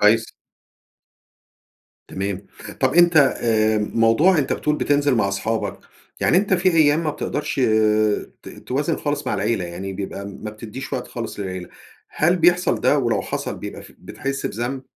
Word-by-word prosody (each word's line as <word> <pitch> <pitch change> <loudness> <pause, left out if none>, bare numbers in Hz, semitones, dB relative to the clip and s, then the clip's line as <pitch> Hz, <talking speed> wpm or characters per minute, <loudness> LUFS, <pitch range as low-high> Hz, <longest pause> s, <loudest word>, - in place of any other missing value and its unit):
كويس. 110 +2 +3 1.8
تمام. 95 0 -4 0.3
طَب، - - +2
أنت 175 -1 +5
آآ، 110 -6 +3
موضوع 115 - +3
أنت 140 - 0
بتقول 150 0 0
بتنزل 145 -2 +2
مع 100 -4 +1
أصحابك، 110 +3 -2 0.4
يعني - - +3
أنت 195 0 +3
في 185 +1 +2
أيام 160 -1 +3
ما 150 - +1
بتقدرش 145 -1 -3 0.8
ت - - -10 0.2
توازن 145 +5 -1
خالص 145 -1 -3
مع - - 0
العيلة، 100 -1 -1
يعني 90 +3 -6
بيبقى 100 +1 -6
ما 105 +2 -7
بتديش 110 +4 -8
وقت 125 - -3
خالص 115 -3 -6
للعيلة. 95 -2 -5 0.4
هل 175 +4 +2
بيحصل 175 +1 +3
ده؟ 145 - +3
ولو 120 -4 0
حصل - - -4
بيبقى - - -7
ف - - -15
بتحس 135 0 -4
بذنب؟ 125 +4 -4
120 Hz, 150 wpm, -21 LUFS, 105-150 Hz, 1.8 s, أنت